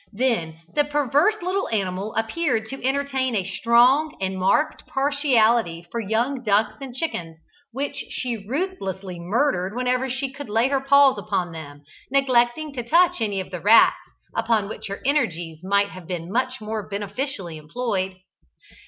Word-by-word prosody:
Then 200 Hz, -9 st, -1 dB
the 295 Hz, -, +3 dB
perverse 295 Hz, -, +2 dB
little 380 Hz, +2 st, -1 dB
animal 195 Hz, -1 st, -2 dB
appeared 225 Hz, +1 st, 0 dB
to 270 Hz, -1 st, -7 dB
entertain 265 Hz, -2 st, 0 dB
a 195 Hz, -, +1 dB
strong 240 Hz, -, +3 dB
and 190 Hz, 0 st, -2 dB
marked 190 Hz, +12 st, +1 dB
partiality 240 Hz, -, +2 dB
for 235 Hz, -, -2 dB
young 230 Hz, +5 st, -1 dB
ducks 215 Hz, -2 st, +2 dB
and 260 Hz, -3 st, -7 dB
chickens, 175 Hz, -, -4 dB, 0.3 s
which 280 Hz, +3 st, -4 dB
she 245 Hz, -2 st, -2 dB
ruthlessly 195 Hz, -, -3 dB
murdered 195 Hz, +1 st, 0 dB
whenever 250 Hz, +1 st, 0 dB
she 265 Hz, +1 st, -3 dB
could 285 Hz, -4 st, -8 dB
lay 225 Hz, +5 st, +2 dB
her 275 Hz, -1 st, +1 dB
paws 275 Hz, -4 st, +5 dB
upon 195 Hz, -4 st, -2 dB
them, 145 Hz, -3 st, -10 dB, 0.3 s
neglecting 270 Hz, +2 st, +2 dB
to 250 Hz, -, -3 dB
touch 335 Hz, +3 st, +3 dB
any 205 Hz, -3 st, 0 dB
of 185 Hz, -, -6 dB
the 180 Hz, -2 st, -5 dB
rats 220 Hz, +5 st, +6 dB, 0.4 s
upon 220 Hz, -4 st, +1 dB
which 215 Hz, -, -7 dB
her 200 Hz, 0 st, -6 dB
energies 175 Hz, -, 0 dB
might 200 Hz, +1 st, +2 dB
have 185 Hz, -4 st, -11 dB
been 175 Hz, -1 st, -5 dB
much 255 Hz, +3 st, -1 dB
more 215 Hz, -1 st, -5 dB
beneficially 200 Hz, -, -4 dB
employed. 190 Hz, +3 st, -3 dB
230 Hz, 155 wpm, -23 LUFS, 195-270 Hz, 0.4 s, rats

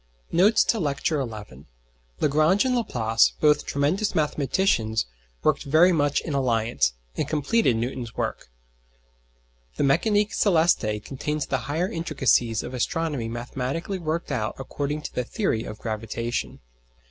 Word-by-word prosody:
NOTES 195 Hz, +6 st, +5 dB
TO 225 Hz, -, +1 dB
LECTURE 145 Hz, -1 st, 0 dB, 0.2 s
XI 65 Hz, +3 st, -15 dB, 0.6 s
Lagrange 155 Hz, -, +3 dB
and 255 Hz, -1 st, +1 dB
Laplace, 115 Hz, -, +2 dB
both 150 Hz, -1 st, +3 dB
tremendous 170 Hz, +10 st, 0 dB
mathematicians, 145 Hz, -, +1 dB, 0.4 s
worked -, -, +2 dB
very 160 Hz, +6 st, +5 dB
much 145 Hz, -4 st, +1 dB
in 155 Hz, -, -5 dB
alliance, 115 Hz, -, +1 dB, 0.2 s
and -, -, -1 dB
completed 155 Hz, -, +2 dB
Newton's 120 Hz, 0 st, -4 dB
work. -, -, -3 dB, 1.3 s
The -, -, 0 dB
Mécanique 205 Hz, +9 st, +2 dB
Céleste 160 Hz, -, +2 dB
contains 150 Hz, +2 st, -3 dB
the 135 Hz, -, -1 dB
higher 165 Hz, +5 st, 0 dB
intricacies 130 Hz, -, +1 dB
of 125 Hz, -, -7 dB
astronomy 140 Hz, -1 st, -1 dB
mathematically 130 Hz, +10 st, -4 dB
worked 165 Hz, -1 st, -3 dB
out 110 Hz, -5 st, -2 dB
according 145 Hz, +3 st, -4 dB
to -, -, -6 dB
the 125 Hz, -, -1 dB
theory 125 Hz, -, -1 dB
of 105 Hz, -, -7 dB
gravitation. 115 Hz, +2 st, -4 dB
145 Hz, 130 wpm, -25 LUFS, 120-165 Hz, 1.3 s, NOTES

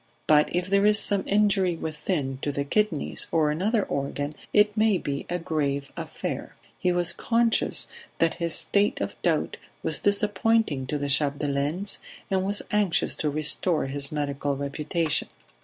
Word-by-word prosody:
But 150 Hz, -1 st, +4 dB
if 180 Hz, 0 st, 0 dB
there 200 Hz, +2 st, +3 dB
is 210 Hz, 0 st, +5 dB
some 200 Hz, -2 st, +2 dB
injury 195 Hz, -3 st, +2 dB
within, 150 Hz, -4 st, -3 dB
to 145 Hz, -, -1 dB
the 140 Hz, 0 st, -2 dB
kidneys 180 Hz, 0 st, +1 dB
or 155 Hz, -2 st, +2 dB
another 205 Hz, +7 st, +1 dB
organ, 145 Hz, +1 st, -3 dB, 0.2 s
it 210 Hz, 0 st, +4 dB
may 215 Hz, -2 st, +3 dB
be 140 Hz, -4 st, -4 dB
a 175 Hz, -, -1 dB
grave 145 Hz, -5 st, -2 dB
affair." -, -, -5 dB, 0.2 s
He 180 Hz, -, +1 dB
was 175 Hz, -1 st, +2 dB
conscious 230 Hz, -1 st, +1 dB, 0.3 s
that 165 Hz, -1 st, +2 dB
his 170 Hz, -1 st, +1 dB
state 200 Hz, +5 st, +2 dB
of -, -, -3 dB
doubt -, -, 0 dB, 0.3 s
was -, -, 0 dB
disappointing 205 Hz, -, +1 dB
to 150 Hz, -, -2 dB
the 145 Hz, 0 st, -3 dB
Chapdelaines, 145 Hz, +5 st, 0 dB, 0.3 s
and 190 Hz, -1 st, +1 dB
was 200 Hz, +2 st, 0 dB
anxious 205 Hz, -4 st, +2 dB
to 150 Hz, -, -2 dB
restore 155 Hz, +3 st, +2 dB
his 140 Hz, +1 st, 0 dB
medical 145 Hz, -1 st, -2 dB
reputation. 150 Hz, +3 st, -1 dB
165 Hz, 155 wpm, -26 LUFS, 145-200 Hz, 0.3 s, is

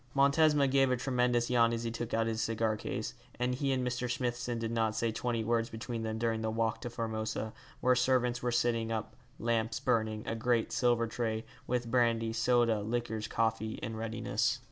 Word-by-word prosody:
Montesma 140 Hz, +1 st, +4 dB
gave 135 Hz, 0 st, +3 dB
a 125 Hz, -, +2 dB
tremendous 125 Hz, -1 st, +1 dB
yawn 115 Hz, -1 st, +4 dB
as 115 Hz, 0 st, -2 dB
he 115 Hz, -, -2 dB
took 120 Hz, 0 st, -4 dB
out 115 Hz, 0 st, +2 dB
his 115 Hz, 0 st, -1 dB
cigar 110 Hz, -1 st, 0 dB
case, 110 Hz, 0 st, -4 dB, 0.2 s
and 125 Hz, +1 st, 0 dB
he 135 Hz, +2 st, 0 dB
and 130 Hz, -1 st, 0 dB
Mr. 125 Hz, 0 st, -2 dB
Smithson 120 Hz, -1 st, -2 dB
did 115 Hz, 0 st, -2 dB
not 115 Hz, -2 st, +1 dB
say 115 Hz, 0 st, 0 dB
twenty 115 Hz, 0 st, -1 dB
words 115 Hz, 0 st, +1 dB
between 115 Hz, +1 st, -5 dB
them 110 Hz, 0 st, -2 dB
during 115 Hz, -1 st, 0 dB
the 110 Hz, -, -1 dB
walk 115 Hz, 0 st, -1 dB
to 120 Hz, -, -4 dB
Formosa, 110 Hz, -1 st, -3 dB, 0.3 s
where 125 Hz, -, +5 dB
servants 125 Hz, -1 st, +2 dB
were 120 Hz, -, 0 dB
sitting 115 Hz, -1 st, +1 dB
up, 110 Hz, -1 st, -3 dB, 0.2 s
lamps 115 Hz, -1 st, 0 dB
burning, 110 Hz, -1 st, 0 dB
a -, -, -2 dB
great 115 Hz, 0 st, +1 dB
silver 120 Hz, -2 st, +2 dB
tray, 115 Hz, -1 st, -2 dB, 0.2 s
with 120 Hz, -1 st, -1 dB
brandy, 115 Hz, -2 st, +2 dB
soda, 115 Hz, -2 st, +3 dB
liqueurs, 110 Hz, 0 st, -2 dB
coffee, 110 Hz, -1 st, 0 dB
in 110 Hz, -, -3 dB
readiness. 115 Hz, +2 st, -1 dB
115 Hz, 190 wpm, -32 LUFS, 110-125 Hz, 0.3 s, where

